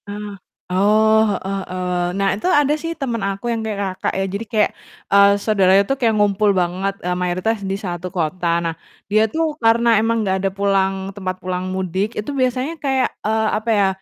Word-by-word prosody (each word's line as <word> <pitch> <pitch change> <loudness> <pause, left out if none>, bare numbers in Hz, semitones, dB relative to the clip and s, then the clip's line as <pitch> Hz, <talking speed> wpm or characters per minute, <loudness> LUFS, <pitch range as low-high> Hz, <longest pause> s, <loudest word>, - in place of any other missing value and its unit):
Nah 205 0 -6 0.4
oh, 215 +3 +4 0.2
heeh 195 +1 -4
heeh, 180 -1 -2 0.2
nah 195 0 +2
itu 205 - -3
ada 290 -4 +3
sih 330 - -3
temen 240 -5 -2
aku 195 +3 -6
yang 230 - -2
kayak, 215 -2 -3 0.2
Kakak - - 0
ya. 195 - 0
Jadi 205 +3 -3
kayak, 215 -3 +2 0.4
eee, 200 0 +7
saudara 200 -3 +2
itu 200 +6 +2
kayak 230 -3 +2
ngumpul 205 0 +2
banget, 185 +2 0
eee, 180 - 0
mayoritas 185 +5 0
di 195 0 -2
1 180 -3 -5
kota, 175 0 -2 0.2
nah 165 - -1 0.4
dia 215 +1 +4
tuh 320 +4 -1
karena 230 0 +4
emang 225 0 +1
nggak 190 -1 +1
ada 195 - +1
pulang 195 -1 0
tempat 185 -2 -4
pulang 185 0 -3
mudik 190 +3 -2
itu 210 +7 -3
biasanya 260 +2 0
kayak, 265 -2 +1
eee, 220 0 0
apa 220 +2 -4
ya, 200 -1 +4
200 Hz, 190 wpm, -20 LUFS, 190-225 Hz, 0.4 s, eee